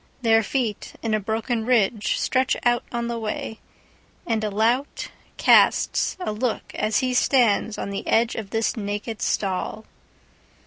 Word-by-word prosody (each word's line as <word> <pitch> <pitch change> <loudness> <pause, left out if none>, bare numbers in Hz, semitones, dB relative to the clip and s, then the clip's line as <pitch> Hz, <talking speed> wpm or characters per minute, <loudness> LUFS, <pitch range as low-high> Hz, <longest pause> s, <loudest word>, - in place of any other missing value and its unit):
Their 225 -1 +5
feet, 225 -2 -2
in 225 -1 -1
a 215 - +2
broken 225 +2 -2
ridgeStretch 240 +3 +1
out 240 0 +2
on 235 -1 -2
the 235 -1 -3
way, 220 0 -4 0.7
and 225 -2 -1
a 215 - 0
lout 230 +7 0 0.3
castsA 365 - +3
look 225 +2 -3
as 215 +3 0
he 255 -1 0
stands 235 -4 +2
on 200 - -4
the 195 - -5
edge 230 +1 +2
of 215 -3 -6
this 225 +1 0
naked 210 +1 -4
stall. 200 +2 -2
225 Hz, 140 wpm, -23 LUFS, 215-240 Hz, 0.7 s, Their